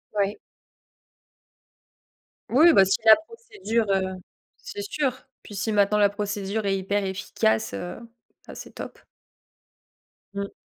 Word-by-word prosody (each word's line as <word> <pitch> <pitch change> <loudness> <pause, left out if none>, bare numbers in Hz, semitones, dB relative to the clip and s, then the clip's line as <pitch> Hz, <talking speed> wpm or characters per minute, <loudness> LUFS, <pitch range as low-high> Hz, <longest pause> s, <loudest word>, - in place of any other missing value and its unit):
Ouais. 200 0 0 2.1
Oui, 315 +7 +6
bah, 195 - +7
si 195 +2 +2
la 220 0 +10
procédure, 400 - -3
heu, 190 -1 0 0.4
c'est 410 -2 -8
sûr, 295 -10 -1 0.3
puis 205 - -12
si 220 +3 -2
maintenant 210 0 +3
la 205 -1 +5
procédure 205 0 -3
est 195 -1 +1
hyper 200 +1 -1
efficace, 185 - -1
heu, 175 - -6 0.5
ah, - - -9
c'est - - -10
top! - - -9 1.3
Mmh. 200 0 -4
205 Hz, 125 wpm, -25 LUFS, 195-235 Hz, 2.1 s, la